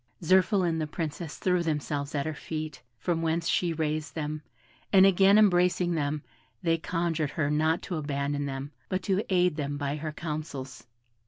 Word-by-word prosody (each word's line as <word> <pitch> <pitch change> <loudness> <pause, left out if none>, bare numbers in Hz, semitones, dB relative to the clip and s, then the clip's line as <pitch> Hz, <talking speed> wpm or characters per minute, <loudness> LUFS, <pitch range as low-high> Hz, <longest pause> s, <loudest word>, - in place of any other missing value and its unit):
Zirphil 185 0 +4
and 160 -1 0
the 155 - -1
Princess 160 0 -5
threw 180 -1 +1
themselves 150 -2 -2
at 140 -1 0
her 155 - -2
feet, 155 -1 -5 0.2
from 165 +7 -1
whence 165 +1 0
she 175 -2 +2
raised 155 -2 -2
them, 155 -1 -3 0.5
and 195 -1 +7
again 195 +1 +6
embracing 180 -3 +4
them, 150 -1 -1 0.4
they 165 -1 +2
conjured 165 -3 -1
her 150 -1 -1
not 155 +2 +1
to 175 - -3
abandon 145 -1 -2
them, 135 +1 -5 0.2
but 185 -1 -1
to 195 0 +1
aid 180 -3 +3
them 145 -1 -2
by 145 0 -2
her 155 +1 -4
counsels. 150 -6 -6
160 Hz, 170 wpm, -28 LUFS, 150-175 Hz, 0.5 s, and